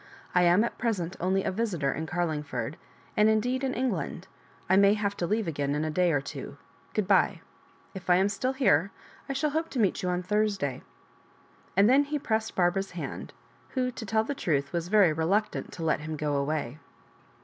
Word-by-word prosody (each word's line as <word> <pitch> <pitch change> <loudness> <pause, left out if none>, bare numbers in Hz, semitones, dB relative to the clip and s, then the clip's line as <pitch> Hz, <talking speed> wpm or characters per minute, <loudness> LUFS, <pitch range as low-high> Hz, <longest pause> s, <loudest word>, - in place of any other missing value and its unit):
"I 180 - +4
am 175 +4 +5
at 235 - -4
present 190 -7 -1
only 190 +2 +1
a - - -1
visitor 185 -9 -1
in 160 +3 -4
Carlingford, 150 -7 -2 0.4
and 210 +1 +5
indeed 245 +5 +1
in 265 -1 -1
Eng 255 +1 +1
land 175 -1 -4 0.2
— - - -29
^I 190 +2 +5
may 200 +1 +6
have 200 -1 -1
to 175 - -1
leave 215 +1 0
again 145 -2 -1
in 150 +1 -1
a 155 - -2
day 180 +2 +2
or 145 - +2
two 140 0 -8 0.2
— - - -31
good 210 -3 0
bye. 195 -1 +3 0.5
If 190 -2 -8
I 180 - +7
am 190 +2 +3
still 210 +6 -1
here, 195 - +3 0.4
I - - 0
shall 290 +2 0
hope 320 +2 -1
to 260 - -3
meet 205 -4 +2
you 180 - -1
on 180 0 -1
Thursday." 200 -9 0 1.0
And 200 +1 +6
then 275 +4 +5
he 295 +1 -2
pressed 220 -5 -1
Barbara's 190 +2 +1
hand, - - -5 0.4
who, 255 -1 +1
to 235 - -8
tell 220 +1 +2
the 285 - -3
truth, 140 - -1
was 170 -1 -1
very 195 -4 +5
reluctant 195 +7 0
to 165 - -6
let 160 - +1
him 155 0 -5
go 150 -1 -1
away. 140 -1 -2
190 Hz, 210 wpm, -28 LUFS, 160-220 Hz, 1.0 s, I